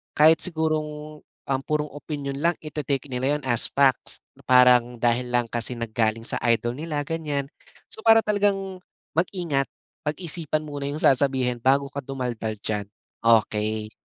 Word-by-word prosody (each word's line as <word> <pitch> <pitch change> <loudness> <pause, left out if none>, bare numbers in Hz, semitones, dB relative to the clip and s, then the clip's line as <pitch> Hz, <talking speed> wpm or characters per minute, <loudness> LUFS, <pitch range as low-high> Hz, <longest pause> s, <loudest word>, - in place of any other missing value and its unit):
kahit 155 +2 +6
sigurong 155 -2 -2
um, 135 -1 -4
purong 150 -1 -1
opinyon 145 -2 -5
lang 170 +1 +2
ite-take 145 -3 -3
nila 130 +4 +1
yun 150 - -13
as 120 -2 +1
facts, 135 -2 +2 0.3
parang 125 -1 +5
dahil 120 +1 +1
lang 120 -1 +2
kasi 120 +1 -3
nanggaling 115 -1 -1
sa - - -1
idol 120 +1 0
nila 155 -1 -2
ganiyan. 150 -4 -2 0.5
So, - - -8
para 225 0 +8
talagang 195 -3 0 0.3
mag-ingat, 165 -5 0 0.4
pag-isipan 155 0 -2
muna 145 -2 -5
yung 145 - -4
sasabihin 130 -2 +2
bago 140 +2 +3
ka 140 - -3
dumaldal 125 -5 -3
diyan. 105 -2 -2 0.4
Okey. 110 -1 +2
140 Hz, 140 wpm, -25 LUFS, 120-155 Hz, 0.5 s, para